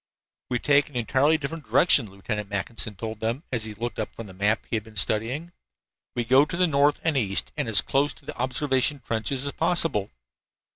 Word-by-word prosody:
"We 125 - +1
take 140 +3 +3
an 145 - -18
entirely 135 +6 +2
different 155 +1 -6
direction," 140 - +4
Lieutenant 100 +1 -5
Mackinson 105 +1 -1
told 110 +3 -6
them, 115 +7 -2
as 115 -4 0
he 110 -1 -5
looked 120 +3 -4
up - - -4
from 115 - -7
the 95 - -11
map 105 +4 0
he - - -2
had 110 - -1
been 110 -1 -16
studying. 115 - 0 0.6
"We 120 -1 -1
go 130 +4 +6
to 150 +3 -4
the 180 - +4
north 145 -2 +3
and 160 -2 +1
east 100 -7 0
and 145 -6 -2
as 110 - +4
close 140 +2 +1
to - - -20
the - - -7
observation 130 +1 0
trenches 125 +4 -1
as 140 - -2
possible." 160 - +1
125 Hz, 205 wpm, -25 LUFS, 110-145 Hz, 0.6 s, go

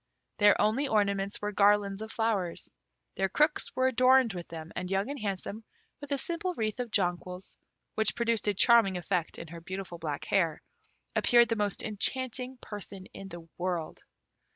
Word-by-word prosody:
Their 205 -1 +6
only 225 +7 +2
ornaments 200 -3 0
were 210 - -1
garlands 200 0 +3
of 220 0 -6
flowers. 210 -7 -1 0.4
Their 195 0 0
crooks 300 - +1
were 260 0 +3
adorned 255 -2 +4
with 175 -2 -6
them, 160 -1 -8
and 180 - -3
Young 195 +7 0
and 285 - -5
Handsome, 205 +1 -4 0.4
with 290 0 -8
a 280 - +2
simple 340 +5 -3
wreath 215 -1 -2
of 245 -1 -2
jonquils, 180 -2 -2 0.4
which 220 -1 +2
produced 230 -2 0
a 205 - +2
charming 220 -3 +5
effect 175 -1 -2
in 165 - -8
her 170 +1 -9
beautiful 185 -1 -6
black 150 -3 -4
hair, 170 -6 +1 0.5
appeared 240 -1 +5
the 230 - +1
most 205 -2 -1
enchanting 255 +4 -2
person 200 -2 -8
in 195 - -8
the 170 -2 -10
world. 175 -3 -3
205 Hz, 170 wpm, -30 LUFS, 185-235 Hz, 0.5 s, Their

